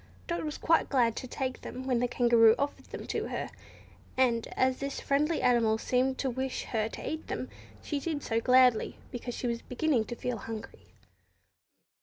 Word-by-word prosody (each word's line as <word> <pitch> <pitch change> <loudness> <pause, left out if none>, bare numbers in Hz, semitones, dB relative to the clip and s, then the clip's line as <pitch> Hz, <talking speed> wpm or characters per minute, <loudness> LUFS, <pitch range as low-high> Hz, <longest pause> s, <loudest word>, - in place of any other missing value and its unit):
Dot 340 - -2
was 300 -1 -4
quite 330 0 +2
glad 240 -5 +3
to 255 - -4
take 260 0 -3
them 260 +1 -7
when 250 -3 +1
the 245 - +1
Kangaroo 235 -2 +5
offered 285 +1 -3
them - - -8
to - - -2
her; - - -4 0.7
and 240 -3 +2
as 260 0 +2
this 275 0 -3
friendly 300 +4 +1
animal 230 -3 +4
seemed 260 +3 +1
to 270 - -1
wish 260 +1 -3
her 220 -1 -1
to - - -7
eat 315 0 -4
them, - - -4 0.3
she 290 - -2
did 295 0 -3
so 225 0 0
gladly, 250 -2 +4
because 245 0 -5
she - - -4
was 235 -1 -1
beginning 250 -3 0
to 240 - -6
feel 245 0 -3
hungry. 220 +1 -8
250 Hz, 185 wpm, -30 LUFS, 235-275 Hz, 0.7 s, Kangaroo